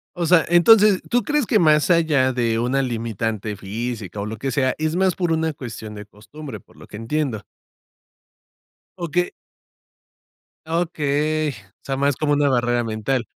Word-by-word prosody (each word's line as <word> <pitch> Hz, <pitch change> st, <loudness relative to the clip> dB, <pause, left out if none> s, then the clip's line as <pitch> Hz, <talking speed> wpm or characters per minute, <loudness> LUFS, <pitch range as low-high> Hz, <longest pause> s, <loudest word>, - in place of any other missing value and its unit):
O 175 Hz, -1 st, -1 dB
sea, 165 Hz, 0 st, +4 dB
entonces, 200 Hz, +3 st, +6 dB
¿tú 245 Hz, 0 st, +2 dB
crees 295 Hz, -3 st, 0 dB
que 215 Hz, -, +2 dB
más 155 Hz, 0 st, +4 dB
allá 150 Hz, -6 st, +3 dB
de 115 Hz, -2 st, 0 dB
una 125 Hz, +3 st, +1 dB
limitante 110 Hz, -3 st, -3 dB
física 105 Hz, 0 st, -5 dB
o 100 Hz, -, -3 dB
lo 110 Hz, +1 st, -5 dB
que 135 Hz, +5 st, -3 dB
sea, 130 Hz, 0 st, +1 dB
es 155 Hz, +1 st, -1 dB
más 185 Hz, -1 st, +2 dB
por 175 Hz, -3 st, -1 dB
una 160 Hz, -1 st, 0 dB
cuestión 110 Hz, -6 st, -8 dB
de 105 Hz, 0 st, -8 dB
costumbre?, 110 Hz, +5 st, -10 dB
por -, -, -24 dB
lo -, -, -14 dB
que 105 Hz, -, -9 dB
entiendo 115 Hz, -1 st, -2 dB, 1.5 s
O 175 Hz, -2 st, -4 dB
que 175 Hz, +3 st, 0 dB, 1.3 s
Okey. 155 Hz, -2 st, 0 dB
O -, -, -10 dB, 0.3 s
sea, 135 Hz, -1 st, -3 dB
más 140 Hz, 0 st, +1 dB
como 145 Hz, +2 st, 0 dB
una 145 Hz, 0 st, +2 dB
barrera 120 Hz, -1 st, +1 dB
mental. 115 Hz, +3 st, -2 dB
140 Hz, 165 wpm, -21 LUFS, 115-160 Hz, 1.5 s, entonces